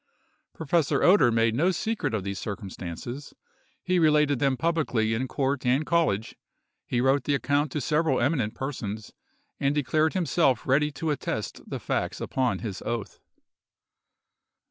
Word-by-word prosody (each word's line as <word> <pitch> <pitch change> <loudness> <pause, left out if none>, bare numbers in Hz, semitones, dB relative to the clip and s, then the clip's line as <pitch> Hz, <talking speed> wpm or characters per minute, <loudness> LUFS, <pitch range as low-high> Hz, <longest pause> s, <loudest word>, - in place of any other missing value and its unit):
Professor 160 -1 +1
Oeder 175 -10 +6
made 115 0 +2
no 155 +10 +2
secret 185 - -1
of 100 - -2
these 100 -1 -4
circumstances; 100 - -6 0.5
he 185 -1 +2
related 150 -4 +3
them 135 -1 +1
publicly 135 -10 0
in 125 +4 -1
court 135 0 -1
and 130 +4 +2
college; 155 -12 +1 0.5
he 120 - 0
wrote 135 +1 +2
the 145 - +2
account 145 +1 0
to 150 - -2
several 150 -2 +1
eminent 120 -5 0
persons, 110 -6 -5 0.5
and 140 +1 +1
declared 155 +2 +1
himself 165 -8 +2
ready 150 +3 +2
to 155 +2 -2
attest 145 - -3
the - - -4
facts - - -2
upon 130 -2 0
his 105 -5 -6
oath. 115 -3 -4
135 Hz, 145 wpm, -26 LUFS, 115-155 Hz, 0.5 s, Oeder